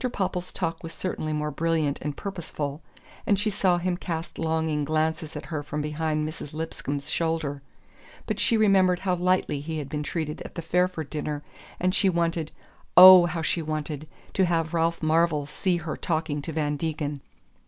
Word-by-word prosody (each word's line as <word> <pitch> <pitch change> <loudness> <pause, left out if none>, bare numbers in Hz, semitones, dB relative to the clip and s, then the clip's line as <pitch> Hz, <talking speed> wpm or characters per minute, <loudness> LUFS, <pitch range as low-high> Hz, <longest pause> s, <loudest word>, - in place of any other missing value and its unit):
Popple's 185 -3 -2
talk 165 -3 -3
was 165 0 -7
certainly 160 -3 -3
more 150 0 -1
brilliant 160 -2 0
and 145 -1 -4
purposeful, 160 -6 -5 0.5
and 200 - +4
she 210 +2 +1
saw 185 -3 +2
him 175 0 -1
cast 165 -2 -5
longing 160 -2 0
glances 155 +1 -1
at - - -6
her 155 -3 -3
from 150 +1 -4
behind 150 0 -1
Mrs. 155 -2 -7
Lipscomb's 145 -3 -4
shoulder; 160 -4 -1 0.6
but - - -2
she 230 - +3
remembered 190 -4 +4
how 190 -2 +1
lightly 180 -4 +1
he 160 +2 -4
had 145 -3 -5
been 150 0 -3
treated 150 0 -3
at - - -9
the 170 - -4
Fairford 180 -2 0
dinner, 150 -1 -3 0.4
and 185 +1 +1
she 195 -1 +3
wanted 170 -2 0 0.5
oh, 185 -1 +11
how 170 -2 -3
she 165 +2 0
wanted! 155 -1 -4 0.3
to 190 - +3
have 165 -2 0
Ralph 165 0 0
Marvell 155 -2 +2
see 180 +4 0
her 165 -2 -4
talking 155 -3 -1
to 165 - -5
Van 150 -2 -1
Degen. 150 -2 -3
160 Hz, 175 wpm, -26 LUFS, 150-175 Hz, 0.6 s, oh